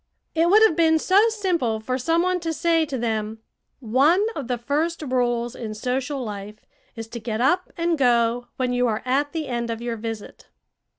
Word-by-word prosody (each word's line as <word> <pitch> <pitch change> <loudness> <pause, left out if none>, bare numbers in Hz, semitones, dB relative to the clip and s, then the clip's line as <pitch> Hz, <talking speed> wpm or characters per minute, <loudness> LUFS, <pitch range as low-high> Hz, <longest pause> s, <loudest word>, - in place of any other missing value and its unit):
It 330 +1 +2
would 425 +4 +6
have 440 -8 +5
been 320 -1 +4
so 395 +7 +4
simple 350 - -1
for 255 +4 -3
some 330 +6 +1
one 365 0 +1
to 330 -1 -3
say 330 -1 +1
to 270 - -3
them: 220 -2 -2 0.4
"One 280 - +3
of 280 -5 -5
the 245 -1 -1
first 300 +7 -1
rules 240 -3 -1
in 215 -2 -6
social 260 +4 -2
life 210 -1 -8 0.3
is 225 -1 -7
to 235 - -6
get 220 -1 -4
up 355 +9 +1
and 335 -2 0
go 240 -1 +2
when 255 -1 0
you 245 0 +2
are 220 -1 -2
at 280 +3 +1
the 320 -2 -3
end 235 -1 -3
of 225 -1 -3
your 235 -1 -4
visit." 225 -1 -7
255 Hz, 195 wpm, -23 LUFS, 235-330 Hz, 0.4 s, would